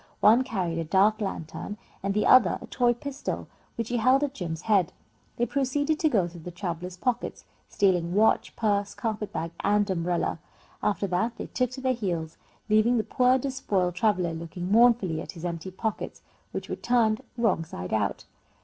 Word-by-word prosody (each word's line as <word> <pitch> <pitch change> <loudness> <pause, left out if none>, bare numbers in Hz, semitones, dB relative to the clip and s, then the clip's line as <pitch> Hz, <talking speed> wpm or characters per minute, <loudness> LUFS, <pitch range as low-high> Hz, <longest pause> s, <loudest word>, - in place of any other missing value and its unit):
One 230 +5 +6
carried 185 -10 -2
a - - -1
dark 200 +6 +3
lantern 195 +1 -5 0.2
and 195 0 -1
the 210 - +2
other 245 -8 +6
a - - -9
toy 240 -1 +2
pistol, 280 +3 -5 0.3
which 230 -1 -3
he 245 - 0
held 255 +5 +4
at 280 -2 -1
Jim's 170 - -5
head. 195 -6 +2 0.4
They 240 - +2
proceeded 285 +4 0
to 315 - +3
go 195 -10 +2
through 170 -1 -11
the 180 - -7
traveller's 180 0 -5
pockets, 250 +4 -2 0.2
stealing 180 -3 +1
watch, 220 +2 +3
purse, 205 -2 0
carpet 210 0 -3
bag, 165 +1 -3
and 205 0 +2
umbrella. 175 -1 -1 0.4
After 205 -1 0
that 200 +6 -1
they - - -5
took 250 -1 -1
to 260 - -7
their 260 0 +2
heels, 170 -8 -3 0.3
leaving 220 +3 +4
the 220 - +1
poor 255 +3 +3
despoiled 210 -9 -1
traveller 180 -3 +1
looking 170 +3 -5
mournfully 220 -8 +4
at - - -8
his 170 -1 -8
empty 170 +1 -4
pockets, 215 +3 -4 0.3
which - - -5
were - - -4
turned 235 -1 +2 0.2
wrong 220 -8 +2
side 90 - -6
out. 105 -2 -1
205 Hz, 180 wpm, -27 LUFS, 175-240 Hz, 0.4 s, One